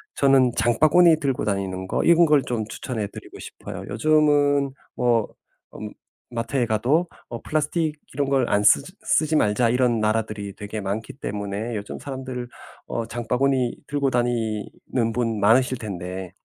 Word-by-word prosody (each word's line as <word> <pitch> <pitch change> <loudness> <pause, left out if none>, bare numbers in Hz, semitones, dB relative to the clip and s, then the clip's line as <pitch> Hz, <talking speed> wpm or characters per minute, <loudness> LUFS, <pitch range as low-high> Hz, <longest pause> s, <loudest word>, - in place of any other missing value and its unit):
저는 135 -3 +4
장바구니 155 +8 +4
들고 135 -7 -1
다니는 95 -2 -2
거 - - -1
이런 170 0 +6
걸 150 -3 +4
좀 115 -3 -2
추천해 110 -2 -4
드리고 - - -12
싶어요. - - -8
요즘은 145 -2 +3 0.2
뭐 120 -3 +2 0.5
음 105 0 -7 0.4
마트에 120 +2 -1
가도 130 +10 +1 0.2
어 115 -1 -6
플라스틱 155 +1 -1 0.2
이런 140 +1 -1
걸 135 -3 +2
안 105 0 +2
쓰지 180 - +4
"쓰지 155 0 +2
말자." 105 +2 +2
이런 125 -1 +2
나라들이 110 -2 -2
되게 105 +1 -6
많기 100 +3 -4
때문에 105 -1 -4
요즘 100 -1 -6
사람들 130 -3 -6 0.4
어 115 - -3
장바구니 125 +2 0
들고 140 -1 0
다니는 115 -1 -1
분 115 -3 -1
많으실 125 +5 +4
텐데 95 -3 -6
120 Hz, 305 characters per minute, -23 LUFS, 110-140 Hz, 0.5 s, 이런